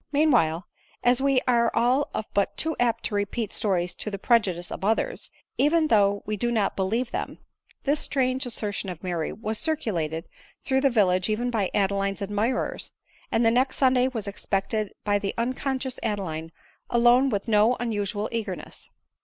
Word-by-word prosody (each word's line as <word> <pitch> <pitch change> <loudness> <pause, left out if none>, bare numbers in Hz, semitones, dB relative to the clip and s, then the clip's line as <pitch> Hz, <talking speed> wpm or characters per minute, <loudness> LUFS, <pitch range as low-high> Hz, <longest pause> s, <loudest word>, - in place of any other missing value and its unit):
Meanwhile, 240 - +3 0.4
as 245 +1 +4
we 275 -2 +3
are 235 -2 +4
all 255 +5 +2
of 215 - -2
us - - -44
but 200 -1 0
too 320 -1 0
apt 240 -2 +1
to - - -3
repeat 205 +2 -2
stories 180 -3 0
to - - -4
the 200 - -4
prejudice 190 -6 +1
of - - -6
others, 225 - 0 0.3
even 310 +2 +3
though 205 -2 +3
we 215 - -2
do 240 +4 0
not 215 -4 +1
believe 225 +6 -1
them, - - -4 0.5
this 290 +1 +2
strange 255 -1 0
assertion 205 -4 -3
of 175 -1 -8
Mary 175 -3 -2
was 220 0 -4
circulated 175 - -2 0.4
through 265 -1 +1
the 275 - +4
village 185 -5 +2
even 240 +3 0
by 210 -5 0
Adeline's 195 0 0
admirers; 210 +5 -1 0.4
and 230 - +2
the 225 - +5
next 260 +3 +2
Sunday 255 -1 +4
was 225 -6 -4
expected 200 +1 -2
by 205 -1 +2
the 200 -1 -3
unconscious 260 +2 -2
Adeline 165 -7 -3 0.4
alone 240 +3 +5
with 205 -2 -2
no 220 +2 +4
unusual 210 -2 -2
eagerness. 220 -6 -5
220 Hz, 170 wpm, -26 LUFS, 200-250 Hz, 0.5 s, the